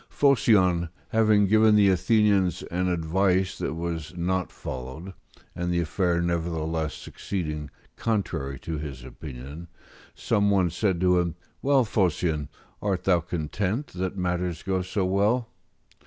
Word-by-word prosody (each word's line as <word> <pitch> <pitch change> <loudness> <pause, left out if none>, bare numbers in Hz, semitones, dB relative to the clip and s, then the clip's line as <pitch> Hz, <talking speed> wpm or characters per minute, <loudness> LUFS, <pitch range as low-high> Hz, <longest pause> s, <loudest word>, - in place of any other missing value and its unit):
Phocion, 95 - +3 0.2
having 110 -2 +4
given 110 +2 +5
the 100 -2 +6
Athenians 95 0 +2
an 90 +2 0
advice 90 +2 +1
that - - -2
was 85 0 -4
not 90 +1 -1
followed, 65 +9 -7 0.4
and 90 0 -2
the 85 - +1
affair 85 +1 0
nevertheless 80 -2 -1
succeeding 75 -6 -5 0.3
contrary 95 -11 -2
to 80 -2 -4
his 70 -4 -7
opinion, 70 +4 -9 0.5
some 100 0 +1
one 95 -4 +3
said 95 0 0
to 90 -1 +4
him, 85 -3 -1 0.3
"Well, 135 -2 +3
Phocion, 85 -7 0 0.3
art 95 -3 -1
thou 90 -3 +4
content 90 - -3
that 95 +2 -3
matters 90 -2 -2
go 95 -1 0
so 95 +1 -1
well?" 105 +5 +1
90 Hz, 130 wpm, -26 LUFS, 80-100 Hz, 0.5 s, the